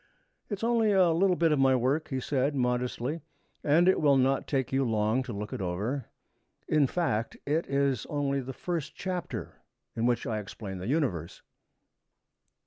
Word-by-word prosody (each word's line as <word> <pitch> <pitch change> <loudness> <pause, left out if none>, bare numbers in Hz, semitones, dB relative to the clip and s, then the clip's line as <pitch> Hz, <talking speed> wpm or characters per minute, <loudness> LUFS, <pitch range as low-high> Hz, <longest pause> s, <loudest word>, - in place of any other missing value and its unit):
'It 205 - -1
is 205 - -10
only 230 -2 +3
a 185 -4 +5
little 180 +3 +3
bit 165 -2 +2
of 150 - +2
my 135 -1 +5
work,' 130 +5 +1
he 130 - -2
said 140 +2 0
modestly, 125 +4 -1 0.4
'and 160 +5 +4
it 190 - +4
will 140 -3 +5
not 135 +1 +2
take 135 -3 -1
you 135 +1 +3
long 110 +1 +1
to 125 -1 -6
look 105 0 -5
it - - -4
over. 105 +10 -2 0.6
In 150 -3 +3
fact 125 -9 -1
it 155 +4 0
is 140 -3 0
only 140 -2 0
the 130 +1 -6
first 165 +1 -4
chapter, 175 - -5 0.3
in 115 +1 +1
which 120 -1 +1
I 110 -4 -1
explain 100 -2 -7
the 90 - -5
Universe.' 120 - -1
135 Hz, 175 wpm, -29 LUFS, 120-160 Hz, 0.6 s, a